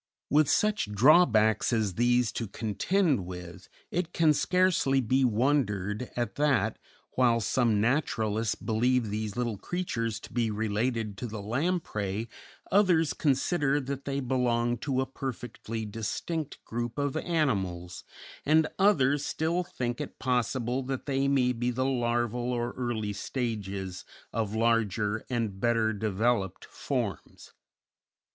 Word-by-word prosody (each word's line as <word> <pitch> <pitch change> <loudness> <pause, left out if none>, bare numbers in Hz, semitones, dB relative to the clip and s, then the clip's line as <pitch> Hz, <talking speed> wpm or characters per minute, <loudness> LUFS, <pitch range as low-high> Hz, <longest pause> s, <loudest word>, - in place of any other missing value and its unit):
With 150 -1 +4
such 210 - +1
drawbacks 110 - +5
as 110 -5 +1
these 120 +1 +2
to 115 - -4
contend 125 - 0
with, 90 0 -9 0.2
it 175 0 -2
can 160 -2 +4
scarcely 180 -5 +2
be 130 +2 +2
wondered 115 -3 +1
at 120 -5 -2
that, 140 -8 +2 0.3
while 120 -2 +3
some 115 0 +2
naturalists 110 -3 0
believe 120 0 +1
these 105 -1 -3
little 120 -5 -2
creatures 115 - -2
to - - -12
be 120 -2 +1
related 110 0 -1
to 125 - -3
the 110 -1 -6
lamprey, 110 - -2 0.4
others 180 -6 +4
consider 145 0 +1
that 140 0 -5
they 140 0 -1
belong 120 -2 0
to 130 0 0
a - - 0
perfectly 120 -4 -5
distinct 125 +9 -4
group 120 0 -4
of 145 -1 -1
animals, 95 - -1 0.4
and 155 +2 +4
others 145 -8 +4
still 165 +5 0
think 120 -6 -4
it 150 - -7
possible 125 0 0
that 130 0 -4
they 135 -1 +1
may 130 -3 +3
be 120 +1 -1
the 130 +2 -1
larval 120 -1 0
or 120 0 -1
early 115 -4 -3
stages 100 -5 -4 0.3
of 110 -2 -1
larger 110 -2 +1
and 115 -6 -2
better 115 0 +2
developed 105 -1 0
forms. - - -4
120 Hz, 130 wpm, -29 LUFS, 110-135 Hz, 0.4 s, drawbacks